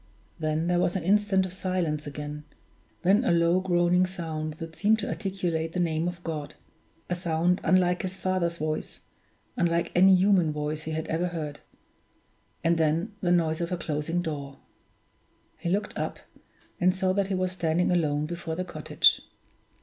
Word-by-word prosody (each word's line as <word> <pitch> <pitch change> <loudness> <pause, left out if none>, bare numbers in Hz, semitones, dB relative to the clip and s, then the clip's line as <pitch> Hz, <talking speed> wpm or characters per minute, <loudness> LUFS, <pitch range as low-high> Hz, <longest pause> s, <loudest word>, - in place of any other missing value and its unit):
Then 155 0 0
there 175 0 +2
was 175 - +1
an 185 - -1
instant 195 0 +3
of 185 - -7
silence 180 -6 -2
again 150 +1 -6 0.6
then 200 +6 +4
a 250 - +2
low 170 +1 +3
groaning 180 0 +3
sound 160 -4 -4
that 165 0 -8
seemed 215 +4 +3
to 210 - -4
articulate 175 -5 -2
the 180 - -1
name 165 -1 0
of 175 -1 -5
God; 155 -3 -5 0.5
a - - -1
sound 175 +1 +1
unlike 180 -1 +3
his 190 0 -4
father's 180 -2 -1
voice, 155 0 -4 0.5
unlike 170 -1 +1
any 190 +2 +7
human 185 -4 +4
voice 150 +1 -3
he 160 - -3
had 160 0 -2
ever 165 +3 -1
heard 155 -4 -5 1.0
and 165 0 +2
then 165 +7 +1
the 175 - +1
noise 165 -2 +2
of 170 +1 -2
a 180 - 0
closing 165 +2 -2
door. 140 -4 -5 1.0
He 170 - -2
looked 200 +4 -1
up, - - -3 0.6
and 180 +1 +3
saw 185 -1 +1
that 200 0 +1
he 195 - -1
was 185 0 0
standing 175 -1 +1
alone 150 -4 +1
before 170 0 -4
the 185 +2 -3
cottage. 180 - +2
175 Hz, 170 wpm, -27 LUFS, 160-185 Hz, 1.0 s, any